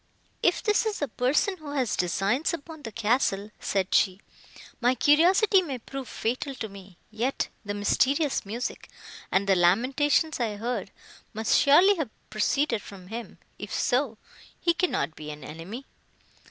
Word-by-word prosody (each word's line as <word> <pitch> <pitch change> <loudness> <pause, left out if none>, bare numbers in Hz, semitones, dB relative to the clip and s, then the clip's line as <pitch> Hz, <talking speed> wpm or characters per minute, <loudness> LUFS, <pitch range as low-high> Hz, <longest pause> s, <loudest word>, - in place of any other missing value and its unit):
"If - - +2
this 425 +1 +2
is 425 - -2
a - - 0
person 275 - +1
who 300 -3 -8
has 260 -6 0
designs 200 - 0
upon 315 0 -11
the 230 -5 -7
castle," 215 -2 0
said 195 -1 -1
she, 190 -1 +3 0.6
"my 245 +1 +3
curiosity 360 - +5
may 285 -8 -4
prove 265 +2 -7
fatal 255 +4 -3
to 225 - -4
me; 195 -3 -13
yet 235 +5 -1
the 205 -1 -4
mysterious 275 +8 +1
music, 230 +5 -5 0.4
and 190 +1 +2
the 195 - +5
lamentations 260 - +2
I 225 -4 -1
heard, 235 +4 -3 0.5
must 220 +1 +1
surely 355 +8 +6
have 305 -8 -2 0.2
proceeded 230 +2 +1
from 190 -3 -12
him: 230 +1 -7 0.2
if - - -7
so, 250 -3 0 0.4
he 340 - +2
cannot 330 - -1
be 150 0 -8
an 150 -1 -8
enemy." 180 - -8
245 Hz, 155 wpm, -27 LUFS, 205-290 Hz, 0.6 s, surely